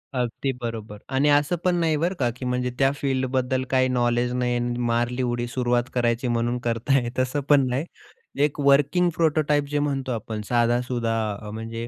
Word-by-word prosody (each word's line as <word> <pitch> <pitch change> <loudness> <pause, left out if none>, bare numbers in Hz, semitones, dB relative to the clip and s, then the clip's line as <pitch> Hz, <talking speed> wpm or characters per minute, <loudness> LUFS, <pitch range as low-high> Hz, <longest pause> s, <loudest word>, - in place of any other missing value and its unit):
अगदी 125 +2 -1
बरोबर 110 -3 -5
आणि 140 +3 +3
असं 145 +4 +3
पण 180 -1 +2
नाही 165 -2 +1
बरं 170 +5 0
का, 125 -3 +2
की 125 - -7
म्हणजे 125 0 -1
त्या 135 0 +4
फील्डबद्दल 130 -1 -1
काही 130 0 +3
नॉलेज 120 -1 +1
नाही 125 -1 0
आणि 120 0 -2
मारली 120 +1 0
उडी, 120 -1 -1
सुरुवात 120 0 0
करायची 120 0 0
म्हणून 120 0 0
करताय 120 +2 +1
तसं 130 +3 0
पण 140 -3 +5
नाही. 130 +5 -1 0.6
एक 150 0 0
वर्किंग 145 +5 +4
प्रोटोटाइप 150 -2 +2
जे 145 0 0
म्हणतो 135 -3 -1
आपण, 110 -2 -4
साधा-सुधा 120 -1 +1 0.3
अ, 105 - -8
म्हणजे 115 +1 -5
125 Hz, 170 wpm, -24 LUFS, 120-140 Hz, 0.6 s, पण